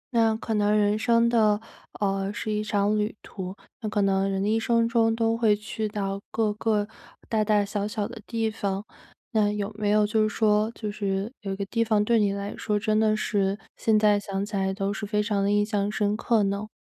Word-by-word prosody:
那 225 -1 +4
可 225 0 -4
能 210 0 +2
人 205 0 +2
生 230 +1 +3
的， 215 -3 +3 0.4
呃， 195 -1 0
是 215 0 -4
一 210 0 -1
场 210 0 +1
旅 210 +1 -1
途。 185 -1 -7 0.3
那 215 - -2
可 205 -1 +1
能 195 0 +2
人 195 0 -1
的 - - 0
一 220 +1 +2
生 230 0 +2
中 230 -1 +2
都 225 0 +1
会 225 -2 +3
去 215 +1 -4
到 200 -1 -3
各 220 -2 0
个 210 -1 0 0.4
大 220 -1 +1
大 210 -1 +2
小 200 0 -2
小 210 -1 -2
的 230 -1 -10
地 225 -1 -1
方， 200 -1 -3 0.5
那 210 -2 +2
有 210 0 -3
没 210 -1 -1
有 210 0 +4
就 215 +1 +1
是 215 - +2
说 215 0 +2
就 215 -2 -4
是 200 +2 -2
有 195 - -4
一 - - -3
个 200 0 -3
地 230 +3 0
方 215 -2 +2
对 230 0 +3
你 205 -1 +2
来 200 +1 -4
说 210 -1 -1
真 215 +1 +1
的 215 -1 +3
是， 200 -2 0 0.2
现 220 -1 +2
在 210 -1 +4
想 195 0 -3
起 210 0 -6
来 190 -1 0
都 195 +1 -2
是 215 - -7
非 210 0 +1
常 205 -2 0
地 200 - +1
印 205 0 +3
象 205 -1 -1
深 210 -1 0
刻 225 -1 +2
呢？ 200 +2 -2
210 Hz, 245 characters per minute, -26 LUFS, 200-220 Hz, 0.5 s, 那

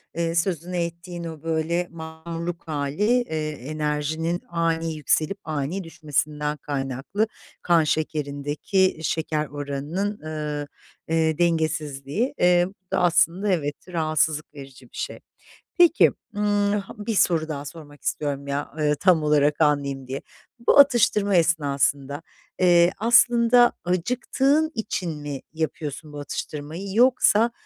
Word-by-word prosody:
eee, 165 0 -1
sözünü 175 0 -1
ettiğin 170 +1 -4
o 160 -2 -7
böyle 165 +2 0
mahmurluk 165 +1 -6
hâli, 145 +3 -2 0.2
eee, 155 -9 -3
enerjinin 155 +4 -2
ani 165 -1 -1
yükselip 155 +5 0
ani 155 +5 -3
düşmesinden 150 -2 -2
kaynaklı, 140 - -2 0.3
kan 170 -2 +4
şekerindeki 150 +4 0
şeker 155 -1 -1
oranının, 145 +9 -3
ııı, 150 -1 -4 0.4
eee, 160 -1 +1
dengesizliği. 160 - 0
Eee, 175 0 +4
bu 190 -2 -25
da - - +1
aslında, 175 +3 +2
evet, 145 -5 0
rahatsızlık 155 -3 0
verici 135 -2 -11
bir - - -12
şey. - - -4 0.6
Peki, 345 -1 +6 0.2
ımm, 205 -1 +1
ha 195 - -9
1 210 +1 -3
soru 165 -4 +2
daha 145 -2 -5
sormak 145 -1 -11
istiyorum, 140 -2 -2
ya, 140 +1 -3
ııı, 150 -1 +2
tam 170 0 +3
olarak 150 0 +2
anlayayım 140 -3 +1
diye. 135 +1 -4 0.5
Bu - - +6
atıştırma 220 -7 +5
esnasında, 145 -3 +1 0.4
eee, 175 -1 +5
aslında 240 +1 +5
acıktığın 255 - +1
için 180 -8 -3
mi 145 -2 -5
yapıyorsun 155 -1 -4
bu 145 - -6
atıştırmayı 150 +5 -5
yoksa 235 -2 +4
160 Hz, 120 wpm, -24 LUFS, 150-180 Hz, 0.6 s, Peki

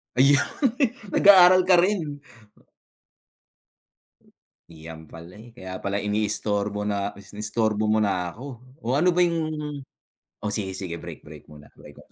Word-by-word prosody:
Ayun, 140 +2 +5 0.7
nag-aaral 185 -2 +6
ka 185 - +6
rin. 175 -6 0 2.5
Iyan 80 0 -11
pala, 85 +5 -13
eh. 115 +1 -15
Kaya 95 -5 -8
pala 100 +1 -3
iniistorbo 105 0 -1
na 100 0 -2
iniistorbo 105 +1 -2
mo 110 +1 +2
na 90 -4 -1
ako. 125 +6 -11 0.4
Oh, 120 +3 -2
ano 175 +4 +3
ba 180 - +2
'yung 170 -1 +2 1.0
oh, 105 - -4
sige, 95 -3 -3
sige, 90 -4 -5
break - - -10
break 75 0 -14
muna 75 -1 -14
break. - - -16
105 Hz, 130 wpm, -24 LUFS, 95-145 Hz, 2.5 s, nag-aaral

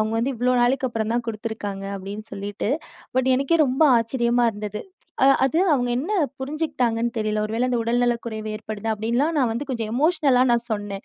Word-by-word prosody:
அவுங்க 215 +1 0
வந்து 255 +4 0
இவ்ளோ 250 +2 +1
நாளைக்கப்புறம் 240 -3 0
தான் 240 - 0
குடுத்துருக்காங்க" 215 -3 -5
அப்டின்னு 200 +2 -7
சொல்லிட்டு 200 +1 -4 0.5
பட் 260 0 +2
எனக்கே 275 +5 +2
ரொம்ப 260 +4 +1 0.2
ஆச்சரியமா 235 +1 +1
இருந்தது. 210 0 -5 0.4
அ - - +6 0.2
அது 270 +5 +1 0.2
அவுங்க 245 -3 0
என்ன 345 +11 -3 0.3
புரிஞ்சுக்ட்டாங்கன்னு 260 -6 -1
தெரில! 215 0 0
ஒருவேள 230 +4 -1
அந்த 240 - +1
"உடல்நலக்குறைவு 235 -2 -1
ஏற்படுது' 215 0 -5
அப்டின்லாம் 240 +9 0
நான் 250 -4 +2
வந்து 265 +5 -4
கொஞ்சம் 225 -3 -3
எமோஷ்னல் 295 -1 +3
லா 255 - +5
நான் 235 0 +1
சொன்னேன். 205 -1 -4
235 Hz, 170 wpm, -23 LUFS, 215-260 Hz, 0.5 s, அ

